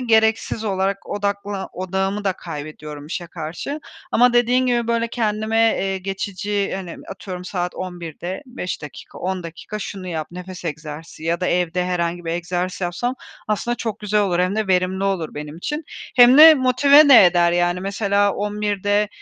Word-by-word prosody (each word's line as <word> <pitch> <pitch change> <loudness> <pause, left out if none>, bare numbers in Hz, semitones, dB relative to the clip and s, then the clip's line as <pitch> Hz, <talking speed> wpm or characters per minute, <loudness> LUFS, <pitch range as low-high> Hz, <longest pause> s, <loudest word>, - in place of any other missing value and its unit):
gereksiz 220 -2 +2
olarak 195 -1 -1
odakla 200 -1 -3
odağımı 190 +2 -2
da 195 - +2
kaybediyorum 150 -3 -8
işe 175 +2 -5
karşı 170 - -6 0.3
ama 245 +1 +5
dediğin 245 +1 +3
gibi, 240 -2 +1
böyle, 230 0 +1
kendime, 220 -1 -1 0.2
eee, 195 0 -1
geçici, 195 +1 -3
hani, 185 -3 -7
atıyorum 180 -2 -7
saat 180 -1 -3
11.00'de 175 -4 -6 0.3
5 210 -10 -5
dakika, 150 - -10
10 185 0 -3
dakika 170 +5 -7
şunu 195 -2 -6
yap, 160 -3 -3
nefes 180 +1 -9
egzersizi 155 0 -7
ya 170 +1 0
da 180 - 0
evde 180 0 0
herhangi 175 -1 -2
bir 165 - -2
egzersiz 175 +2 -3
yapsam 185 +8 -2 0.3
aslında 225 +3 0
çok 220 -3 -4
güzel 210 0 +1
olur, 185 -4 +1
hem 185 +3 +1
de 220 - 0
verimli 185 +1 +1
olur 190 -5 -1
benim 150 +1 -7
için. 295 - -4 0.3
Hem 245 +2 +8
de 315 +1 +11
motive 280 +3 +6
de 250 -8 +9
eder, 175 -1 +3
yani, 175 +1 +1
mesela, 200 +1 +1
11.00'de 205 0 0
190 Hz, 160 wpm, -21 LUFS, 175-215 Hz, 0.3 s, de